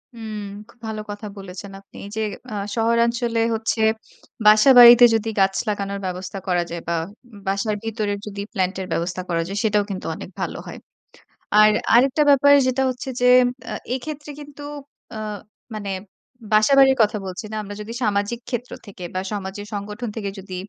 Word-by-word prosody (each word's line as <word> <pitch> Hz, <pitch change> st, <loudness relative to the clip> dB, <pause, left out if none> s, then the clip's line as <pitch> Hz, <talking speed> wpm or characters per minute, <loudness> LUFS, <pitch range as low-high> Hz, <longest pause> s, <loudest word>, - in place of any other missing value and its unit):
হুম, 220 Hz, -2 st, -6 dB, 0.3 s
খুব 240 Hz, -, -21 dB
ভালো 215 Hz, -1 st, -4 dB
কথা 205 Hz, +1 st, -7 dB
বলেছেন 195 Hz, 0 st, -9 dB
আপনি। 195 Hz, -, -23 dB
এই -, -, -8 dB
যে 220 Hz, -, -1 dB, 0.3 s
আ -, -, -5 dB, 0.2 s
শহরাঞ্চলে 235 Hz, 0 st, +1 dB, 0.2 s
হচ্ছে 225 Hz, 0 st, -1 dB, 0.6 s
বাসাবাড়িতে 240 Hz, +2 st, +9 dB
যদি 225 Hz, 0 st, -1 dB
গাছ 195 Hz, 0 st, +3 dB, 0.2 s
লাগানোর 200 Hz, -1 st, -3 dB
ব্যবস্থা 185 Hz, +1 st, -5 dB
করা 175 Hz, -1 st, +1 dB
যায় 170 Hz, 0 st, -5 dB
বা 170 Hz, -, 0 dB, 0.5 s
বাসার 200 Hz, +2 st, 0 dB
ভিতরে 215 Hz, -2 st, -2 dB
যদি 200 Hz, -1 st, -6 dB
প্ল্যান্ট 185 Hz, -2 st, 0 dB
এর 185 Hz, -, -5 dB
ব্যবস্থা 180 Hz, +2 st, -2 dB
করা 165 Hz, -1 st, +1 dB
যায় 195 Hz, +2 st, -5 dB
সেটাও 210 Hz, -2 st, +2 dB
কিন্তু 190 Hz, -2 st, -5 dB
অনেক -, -, -9 dB
ভালো -, -, -3 dB
হয়। -, -, -8 dB, 0.8 s
আর 215 Hz, 0 st, +7 dB, 0.2 s
আরেকটা 270 Hz, +5 st, +4 dB
ব্যাপার 285 Hz, 0 st, +6 dB
যেটা 260 Hz, +1 st, +1 dB
হচ্ছে 255 Hz, +1 st, -7 dB
যে 250 Hz, -, +3 dB, 0.5 s
আ -, -, -3 dB, 0.2 s
এক্ষেত্রে 295 Hz, +3 st, -6 dB
কিন্তু 290 Hz, 0 st, -11 dB, 0.5 s
আ -, -, -5 dB, 0.6 s
মানে 205 Hz, -2 st, -5 dB, 0.6 s
বাসাবাড়ির 265 Hz, +5 st, +5 dB
কথা 210 Hz, 0 st, +1 dB
বলছি 185 Hz, +4 st, -6 dB
না। 215 Hz, -, -5 dB
আমরা 205 Hz, 0 st, -8 dB
যদি 210 Hz, +2 st, -7 dB
সামাজিক 210 Hz, +2 st, 0 dB
ক্ষেত্র 245 Hz, -1 st, -4 dB
থেকে 190 Hz, -3 st, -10 dB
বা 185 Hz, -, -1 dB
সমাজের 205 Hz, 0 st, -5 dB
সংগঠন 210 Hz, +4 st, -5 dB
থেকে 205 Hz, -3 st, -3 dB
যদি 190 Hz, -1 st, -8 dB
215 Hz, 165 wpm, -22 LUFS, 195-235 Hz, 0.8 s, বাসাবাড়িতে